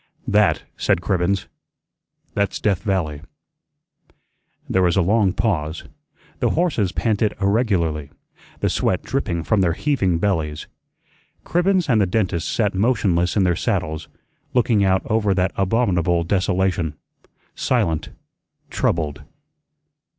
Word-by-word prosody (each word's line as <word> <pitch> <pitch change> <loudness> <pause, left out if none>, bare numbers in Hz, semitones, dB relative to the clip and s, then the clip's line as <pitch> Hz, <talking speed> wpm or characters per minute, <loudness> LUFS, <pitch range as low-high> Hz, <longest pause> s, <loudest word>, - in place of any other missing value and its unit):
"That," - - +3
said - - +1
Cribbens, 90 +1 0 0.9
"that's 100 -1 -1
Death 100 -4 0
Valley." 85 -8 -1 1.5
There 95 - +1
was 90 -1 +2
a - - +5
long 100 +1 +3
pause. 80 -7 -1 0.6
The - - +2
horses 150 - +1
panted 110 0 0
irregularly, 95 - 0 0.5
the - - +2
sweat - - 0
dripping 85 -2 -2
from 105 +3 +2
their 85 -3 +2
heaving 95 - 0
bellies. 80 -6 -1 0.8
Cribbens 180 0 +2
and 115 -6 +3
the 100 - +2
dentist 90 -4 -1
sat 105 -3 +1
motionless 95 -4 +1
in 100 - +4
their 90 -2 +2
saddles, 80 0 -2 0.5
looking 115 -4 +3
out 95 -1 +2
over 105 -3 +1
that 90 0 0
abominable 95 -5 +1
desolation, 90 -3 0 0.6
silent, 80 -2 0 0.6
troubled. 75 -3 -1
95 Hz, 115 wpm, -21 LUFS, 85-105 Hz, 1.5 s, a